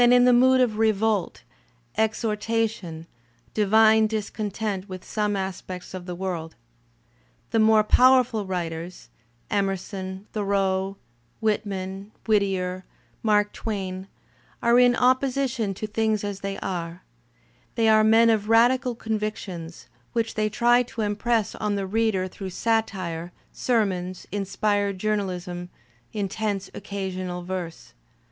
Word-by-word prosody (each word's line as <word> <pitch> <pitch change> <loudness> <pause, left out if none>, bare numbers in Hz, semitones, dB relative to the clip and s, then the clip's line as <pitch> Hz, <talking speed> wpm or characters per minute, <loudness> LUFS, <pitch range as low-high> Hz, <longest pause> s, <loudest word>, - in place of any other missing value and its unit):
in 245 0 +6
the 250 - +6
mood 260 +2 +5
of 225 -4 +2
revolt, 220 -3 +1 0.5
exhortation, 220 -6 -1 0.5
divine 220 +1 +5
discontent 210 -2 -3
with 185 -1 -8
some 210 -1 -1
■ - - -1
/> - - -1
aspects 185 -1 -5
of 185 -1 -7
the 180 - -4
world. 175 -3 -4 1.0
The 225 - +2
more 220 0 +5
powerful 250 -2 +4
writers, 175 -1 -5 0.4
Emerson, 195 -1 -2
| - - -40
Thoreau, 195 -2 0 0.4
Whitman, 200 -2 -2
Whittier, 190 -4 +1 0.4
Mark 210 -1 +2
Twain, 190 -3 -4 0.6
are 235 +1 +5
in 245 0 +5
opposition 255 -4 +1
to 215 - -4
things 215 0 0
as 205 -1 -4
they 195 0 -4
are; 175 -1 -4 0.7
they 230 -1 +2
are 215 0 +6
men 225 +1 +6
of 215 -1 0
radical 245 +2 +4
convictions, 210 -7 -4 0.3
which 230 -1 0
they 215 -1 0
try 240 +3 +4
to 240 -2 -5
impress 215 +1 0
on 210 -1 -2
the 200 -1 -2
reader 205 -2 +1
through 190 +1 -7
satire, 185 -6 -1 0.2
ser 235 -4 +2
mons, 185 -1 -5
inspired 205 0 0
journalism, 185 -3 -2 0.4
intense 205 -1 -2
occasional 185 -3 -4
verse. 180 -2 -6
205 Hz, 125 wpm, -25 LUFS, 190-220 Hz, 1.0 s, in